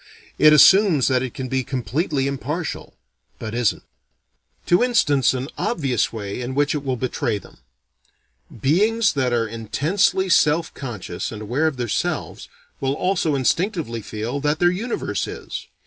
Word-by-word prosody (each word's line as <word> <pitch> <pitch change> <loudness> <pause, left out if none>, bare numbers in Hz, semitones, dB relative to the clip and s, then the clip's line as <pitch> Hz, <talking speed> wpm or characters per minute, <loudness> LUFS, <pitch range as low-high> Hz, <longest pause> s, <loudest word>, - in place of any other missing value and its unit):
It 155 +1 +7
assumes 170 - +6
that 130 -1 +2
it 130 -2 -5
can 130 - -4
be 130 +1 -1
completely 135 +3 -2
impartial 145 +4 -4 0.4
but 110 -1 -6
isn't. 120 -2 0 0.8
To 175 - +3
instance 145 - +3
an 130 +1 -3
obvious 135 - 0
way 105 0 -5
in 125 +2 -4
which 145 0 +2
it 150 -2 -3
will 130 -2 -1
betray 125 -3 -2
them: 100 - -15 1.0
beings 210 - +2
that 130 -3 0
are 115 -1 +1
intensely 155 - 0
self 160 -2 +3
conscious 110 -10 -6
and 110 -1 -7
aware 130 +9 0
of 150 -4 -2
their 120 -1 -2
selves, - - -3 0.3
will 135 0 0
also 175 -4 0
instinctively 150 - -1
feel 110 +6 -4
that 150 +2 0
their 175 +1 +3
universe 225 +7 -3
is. - - -7
140 Hz, 150 wpm, -22 LUFS, 120-165 Hz, 1.0 s, It